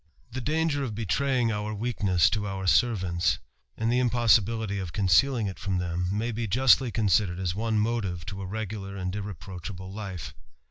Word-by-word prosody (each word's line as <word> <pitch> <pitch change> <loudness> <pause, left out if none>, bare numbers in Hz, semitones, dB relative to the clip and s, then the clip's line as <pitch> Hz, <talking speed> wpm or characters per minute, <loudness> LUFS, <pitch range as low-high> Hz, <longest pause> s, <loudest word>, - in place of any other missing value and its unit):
The 130 +3 -4
danger 155 0 0
of 115 -6 -4
betraying 120 +3 +1
our 105 0 -3
weakness 100 -6 +2
to 105 -2 -1
our 95 -1 -4
servaotaj 90 -7 +2 0.4
and 115 +1 0
the 125 - +3
impossibility 115 -4 +2
of 90 -4 -5
concealing 110 +5 +3
it 95 -2 -5
from 95 -1 -1
them, 90 0 -2
may 110 +4 -1
I 115 0 -2
justly 130 +4 +4
considered 105 -5 +2
as 90 -2 -1
one 110 +2 -1
motive 105 -6 -1
to 95 +2 -6
a 95 - -5
regular 100 -1 -5
and 90 -1 -3
irreproacl* 100 -2 -6
able 95 +2 -9
life. 95 -9 -6
105 Hz, 175 wpm, -27 LUFS, 95-115 Hz, 0.4 s, justly